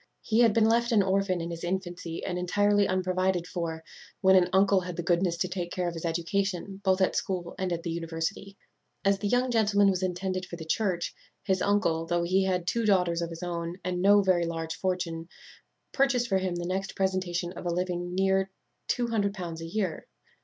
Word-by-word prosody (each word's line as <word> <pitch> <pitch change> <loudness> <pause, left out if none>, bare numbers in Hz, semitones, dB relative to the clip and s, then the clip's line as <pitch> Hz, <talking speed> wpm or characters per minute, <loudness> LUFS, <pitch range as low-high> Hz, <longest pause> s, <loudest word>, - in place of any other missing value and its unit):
He 220 0 +1
had 235 -2 +6
been 220 +1 +3
left 235 +2 +2
an 210 -3 +5
orphan 190 -2 +1
in 170 +1 -4
his 170 0 -6
infancy, 175 -2 -4
and 180 -1 -2
entirely 205 +3 +2
unprovided 185 -1 0
for, 165 -3 -4 0.4
when 190 -1 +5
an 180 -1 +5
uncle 195 0 +4
had 180 -1 -6
the 175 - -3
goodness 175 0 +1
to 185 - 0
take 180 -1 -4
care 180 -1 -1
of 170 - -2
his 165 0 -6
education, 190 +3 -2
both 190 0 +2
at 190 - +2
school 180 -3 -2
and 185 -1 -1
at 170 -1 -2
the 170 - -3
university. 165 +4 -4 0.5
As 195 0 +3
the 205 - -1
young 245 +3 +2
gentleman 205 -3 +4
was 185 -1 -2
intended 185 0 -2
for - - -7
the 165 -2 -8
church, 180 0 -1 0.3
his 190 -2 0
uncle, 170 -6 +1
though 175 0 +1
he 190 +2 +2
had 180 -2 0
two 230 +6 0
daughters 180 -5 +2
of 170 - -2
his 165 +1 -8
own, 170 0 -3
and 180 0 -2
no 205 +1 +6
very 175 -3 +2
large 165 -1 -3
fortune, 175 -2 -3 0.6
purchased 260 -3 +2
for 190 - +3
him 185 -2 -2
the 175 0 -3
next 190 +2 -3
presentation 185 -2 -1
of 180 - -6
a - - +1
living 180 0 -1
of 175 - -5
near 190 +1 +2 0.4
L200 200 -8 -1
a - - -5
year. 185 -3 -2
185 Hz, 205 wpm, -28 LUFS, 175-195 Hz, 0.6 s, had